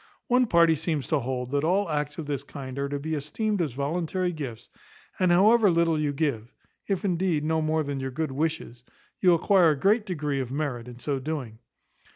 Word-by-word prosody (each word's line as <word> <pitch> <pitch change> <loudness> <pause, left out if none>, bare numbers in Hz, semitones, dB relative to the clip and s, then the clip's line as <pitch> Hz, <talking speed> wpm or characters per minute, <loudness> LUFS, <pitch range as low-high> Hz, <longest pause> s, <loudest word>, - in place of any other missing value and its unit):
One 250 0 +3
party 170 -4 +5
seems 155 -2 -2
to 155 - +2
hold, 125 0 -4
that 140 0 0
all 185 +5 +2
acts 150 -2 -2
of 160 - -5
this 145 -2 -2
kind 135 -2 -8
are 140 0 -1
to 145 - -2
be 155 +3 -4
esteemed 190 +8 -1
as 150 -7 -2
voluntary 170 +6 -1
gifts, 120 -7 -7 0.5
and, 185 -1 +3
however 210 +4 +5
little 165 -2 +2
you 150 -1 0
give 135 -6 -2 0.4
(if 195 +1 -1
indeed 175 -4 0
no 160 +1 +1
more 155 0 +1
than 140 -1 -4
your 135 0 -3
good 155 +2 -3
wishes), 145 -4 -3 0.4
you 180 -2 +5
acquire 180 0 +4
a 150 -3 0
great 210 - +2
degree 150 -6 -2
of 130 -2 -4
merit 135 -5 -3
in 120 -1 -10
so 135 +2 -2
doing. 130 -6 -5
155 Hz, 200 wpm, -26 LUFS, 140-175 Hz, 0.5 s, party